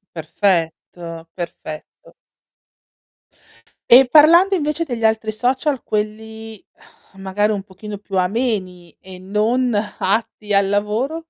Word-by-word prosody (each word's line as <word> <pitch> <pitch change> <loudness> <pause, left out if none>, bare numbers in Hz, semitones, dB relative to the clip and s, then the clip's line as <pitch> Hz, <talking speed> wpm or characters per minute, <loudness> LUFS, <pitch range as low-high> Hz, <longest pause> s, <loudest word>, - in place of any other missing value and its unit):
Perfetto, 165 -1 -2
perfetto. 155 -3 -9 1.8
E 260 +2 +9
parlando 335 +7 +6
invece 305 -1 -1
degli 240 -5 -5
altri 220 0 +1
social, 255 +5 -1
quelli 220 0 -5 0.5
magari 195 +2 -1
un 195 -2 -4
pochino 205 +2 -9
più 195 -2 -3
ameni 185 - -2
e 185 -1 -11
non 215 +6 0
atti 210 0 -2
al 200 0 +3
lavoro? 225 +11 -2
210 Hz, 100 wpm, -19 LUFS, 190-245 Hz, 1.8 s, E